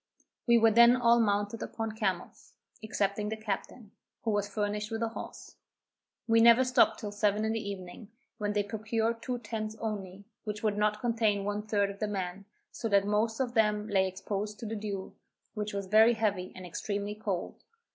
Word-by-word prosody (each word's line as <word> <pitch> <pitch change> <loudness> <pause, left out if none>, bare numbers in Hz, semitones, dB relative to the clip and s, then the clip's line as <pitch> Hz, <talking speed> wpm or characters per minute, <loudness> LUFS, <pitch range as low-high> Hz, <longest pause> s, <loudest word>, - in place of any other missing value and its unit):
We 235 0 +6
were 225 -1 +5
then 235 +2 +7
all 235 -1 +4
mounted 205 0 0
upon 225 -1 -4
camels, 200 -5 -3 0.3
excepting 210 -1 -1
the 220 - -3
captain, 215 +1 -5 0.3
who 225 - 0
was 205 -1 0
furnished 210 0 -2
with 225 0 -2
a 230 - 0
horse. 225 - -9 0.7
We 225 0 +5
never 235 +2 +7
stopped 250 0 +3
till 210 -3 -5
seven 210 +1 +1
in 220 - 0
the 225 - -1
evening, 195 +2 -8 0.3
when 205 -1 -1
they 205 0 +1
procured 220 +2 -2
two 250 0 -3
tents 215 -1 -5
only, 200 -3 -5 0.2
which 210 -1 -5
would 210 -2 +1
not 210 0 +1
contain 225 -4 +1
one 205 +1 -2
third 205 -2 +1
of 200 - -12
the 215 - -1
men, 195 -1 -4 0.3
so 225 - -4
that 200 -1 +4
most 215 +3 0
of 250 -2 -1
them 210 -2 +2
lay 190 -2 +3
exposed 205 +2 -4
to - - -5
the 225 +1 -3
dew, 200 -3 -5 0.4
which 210 -1 -3
was 200 -1 -3
very 220 +4 +6
heavy, 205 -5 -1
and 185 - -8
extremely 200 +3 -3
cold. 205 -4 -4
210 Hz, 185 wpm, -30 LUFS, 200-225 Hz, 0.7 s, then